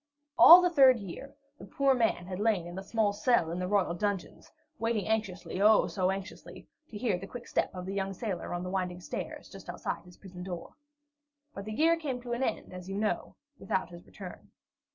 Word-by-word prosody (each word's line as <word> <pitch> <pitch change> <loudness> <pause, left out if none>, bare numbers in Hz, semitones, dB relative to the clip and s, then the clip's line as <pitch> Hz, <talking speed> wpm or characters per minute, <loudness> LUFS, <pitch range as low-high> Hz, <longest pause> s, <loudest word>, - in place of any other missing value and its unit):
All 360 +2 +11
the 355 - +4
third 265 -6 +7
year 205 +6 -9 0.2
the - - -10
poor 275 -1 +2
man 225 -8 +1
had 185 0 -6
lain 205 -5 +1
in 175 0 -8
a - - -6
small 205 +1 0
cell 205 -5 +2
in 175 - -3
the 180 - -2
royal 195 -3 +1
dungeons, 200 +1 -3 0.3
waiting 225 -4 0
anxiously, 195 -5 -2
oh, 215 +1 +6
so 185 -2 0
anxiously, 190 0 -6 0.2
to 215 - -7
hear 205 -5 0
the 195 - -8
quick 245 +2 -9
step - - 0
of 180 0 -6
the 195 +1 -4 0.2
sailor 190 -3 -4
son - - -7
on 175 0 -3
the 180 - -5
winding 180 -2 -2
stairs 175 - -6
just - - -12
outside - - -4
his 180 -1 -16
prison 185 -2 -11
door. 180 -2 -7 0.8
But 200 - -7
the 215 - -5
year 325 +7 +3
came 280 -6 -3
to 240 -1 -4
an 240 - -2
end, 225 -7 -2
as 180 +1 -8
you 195 - -3
know, 215 0 -2 0.2
without 190 -1 -2
his 175 0 -11
return. 185 -3 -10
200 Hz, 215 wpm, -30 LUFS, 180-230 Hz, 0.8 s, All